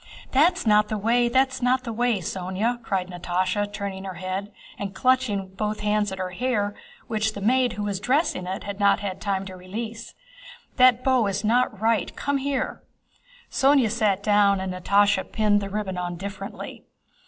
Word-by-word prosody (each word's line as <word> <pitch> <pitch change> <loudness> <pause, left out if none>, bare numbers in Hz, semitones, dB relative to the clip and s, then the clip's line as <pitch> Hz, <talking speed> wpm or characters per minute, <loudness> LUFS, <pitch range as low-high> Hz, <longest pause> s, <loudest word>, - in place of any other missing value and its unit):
"That's 340 +5 +3
not 210 -1 +4
the 215 - -2
way, 235 +3 +2
that's 260 +1 +2
not 255 +1 +2
the 230 -2 -4
way, 240 -1 +1
Sónya!" 190 +7 -2
cried 190 -5 -2
Natásha 185 +3 -1
turning 200 -2 -5
her 190 -2 -6
head 185 +3 -4 0.3
and 195 -1 -5
clutching 255 -2 +2
with 190 0 -14
both 210 0 -2
hands 210 -1 +1
at 190 - -5
her 185 -1 -3
hair 205 0 -1 0.3
which 220 -1 -1
the 205 - -6
maid 245 +3 +2
who 210 - -4
was 200 -2 -2
dressing 250 - 0
it 190 +3 -4
had 200 0 -6
not 200 0 +4 0.2
time 195 -2 -1
to 190 -1 -8
release. 220 +5 -7 0.6
"That 255 -1 +5
bow 255 -5 +3
is 200 +1 -2
not 225 -1 +2
right. 220 -3 +1
Come 285 0 -1
here!" 275 -1 -2 0.7
Sónya 270 -5 +4
sat 210 -4 +1
down 205 -2 +4
and 190 -1 -3
Natásha 200 +1 +2
pinned 210 -2 +2
the 200 - -4
ribbon 195 -3 -3
on 175 -1 -3
differently. 195 +3 -7
210 Hz, 175 wpm, -24 LUFS, 195-240 Hz, 0.7 s, That